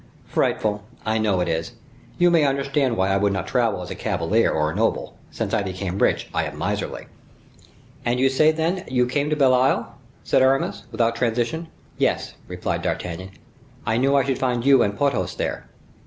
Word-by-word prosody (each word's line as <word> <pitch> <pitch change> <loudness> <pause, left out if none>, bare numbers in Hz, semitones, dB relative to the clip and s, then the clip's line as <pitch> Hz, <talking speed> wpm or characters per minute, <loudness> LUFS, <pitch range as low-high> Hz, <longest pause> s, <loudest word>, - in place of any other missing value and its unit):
"Frightful! 105 -1 0 0.2
I 110 0 +1
know 100 -4 +1
it 90 - 0
is. 80 0 -2 0.4
You 175 0 +4
may 165 -3 +4
understand 140 -2 +1
why 95 +1 +2
I 95 - +3
would 100 0 +2
not 95 -2 -2
travel 115 -6 0
as 90 - -8
a - - -4
cavalier 100 +2 +1
or 75 0 0
a - - -7
noble; 110 +2 0
since - - -4
I - - +2
became 95 0 -4
rich, - - +2
I - - 0
am - - -7
miserly." - - -3 1.0
"And 120 +1 0
you 135 - +4
say, 155 +4 +4
then, 165 +4 -1
you 125 -1 +2
came 140 +4 -1
to 150 - +1
Belle 135 -3 +4
Isle?" 130 +1 +2 0.3
said - - +2
Aramis, 135 +1 +1
without 115 0 +1
transition. 120 +7 -1 0.3
"Yes," - - 0
replied - - -3
D'Artagnan; 90 +1 -3 0.6
"I 110 - +1
knew 135 +3 +3
I 140 - +4
should 135 -2 -1
find 125 -2 0
you 135 -2 +6
and 100 -2 0
Porthos 140 -1 0
there." - - -3
120 Hz, 190 wpm, -23 LUFS, 100-135 Hz, 1.0 s, you